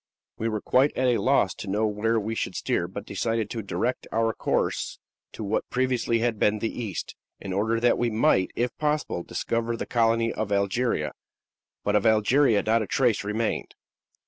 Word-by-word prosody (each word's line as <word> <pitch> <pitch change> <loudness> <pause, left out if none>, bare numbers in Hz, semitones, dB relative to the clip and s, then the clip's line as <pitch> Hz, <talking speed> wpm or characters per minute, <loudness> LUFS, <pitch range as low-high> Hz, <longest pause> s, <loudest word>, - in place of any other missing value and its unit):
We 115 - 0
were 105 -2 -2
quite 135 +3 +2
at 130 - +2
a 120 -2 +2
loss 130 -8 +3
to 100 - -7
know 105 +3 +1
where 110 +2 +1
we 110 +1 -3
should - - -3
steer, - - -1
but - - -7
decided 115 -2 -2
to 115 - -3
direct 100 +5 -2
our 115 0 +1
course - - -1 0.4
to - - -6
what 105 +1 -1
previously 125 -2 +1
had 115 -2 0
been 105 +1 +3
the 110 +1 -3
east, 110 -7 -5 0.2
in 95 - -5
order 110 +4 +1
that 120 +1 +3
we 120 - +2
might, 110 -3 +2
if 120 0 -1
possible, 150 - 0
discover 115 +5 -2
the - - -3
colony 115 -1 +2
of 110 -1 -3
Algeria; 100 +5 0 0.7
but 105 - +1
of 105 - +3
Algeria 110 +1 +4
not 115 +1 +2
a 110 - -3
trace 120 -7 +2
remained." 105 +2 -2
115 Hz, 185 wpm, -26 LUFS, 105-120 Hz, 0.7 s, Algeria